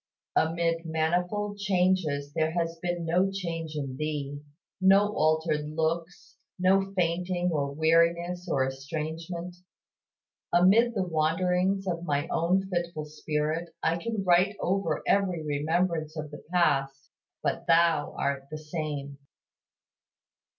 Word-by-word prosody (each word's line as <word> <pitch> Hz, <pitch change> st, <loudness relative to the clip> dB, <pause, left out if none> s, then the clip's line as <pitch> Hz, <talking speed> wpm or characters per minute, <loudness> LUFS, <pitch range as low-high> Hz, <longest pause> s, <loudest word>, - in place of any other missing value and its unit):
Amid 165 Hz, +1 st, +1 dB
manifold 180 Hz, +6 st, -1 dB
changes 180 Hz, -7 st, +1 dB
there 160 Hz, 0 st, +1 dB
has 165 Hz, -1 st, -2 dB
been 175 Hz, -1 st, -2 dB
no 180 Hz, +4 st, +2 dB
change 165 Hz, -5 st, -4 dB
in 135 Hz, -3 st, -4 dB
Thee, 145 Hz, -1 st, -3 dB, 0.4 s
no 200 Hz, +2 st, +5 dB
altered 155 Hz, -1 st, +1 dB
looks, 165 Hz, +2 st, -3 dB, 0.2 s
no 195 Hz, +1 st, +3 dB
fainting 180 Hz, 0 st, 0 dB
or 140 Hz, -3 st, -1 dB
weariness 170 Hz, +3 st, +2 dB
or 135 Hz, -4 st, +2 dB
estrangement. 160 Hz, +6 st, -5 dB, 0.9 s
Amid 210 Hz, +7 st, +5 dB
the 195 Hz, -, +1 dB
wanderings 180 Hz, +4 st, +1 dB
of 170 Hz, -2 st, -2 dB
my 145 Hz, -1 st, -1 dB
own 185 Hz, +4 st, +1 dB
fitful 175 Hz, -4 st, -3 dB
spirit 155 Hz, +2 st, -3 dB
I 165 Hz, +1 st, +2 dB
can 210 Hz, +3 st, -3 dB
write 185 Hz, +3 st, +4 dB
over 180 Hz, -4 st, 0 dB
every 185 Hz, -5 st, +1 dB
remembrance 155 Hz, +2 st, 0 dB
of 150 Hz, -1 st, -5 dB
the 150 Hz, -, -10 dB
past, 140 Hz, -6 st, +1 dB, 0.3 s
But -, -, -2 dB
"Thou 165 Hz, -3 st, +3 dB
art 140 Hz, -1 st, -1 dB
the 155 Hz, -, -5 dB
same!" 150 Hz, -3 st, -5 dB
165 Hz, 120 wpm, -28 LUFS, 155-180 Hz, 0.9 s, no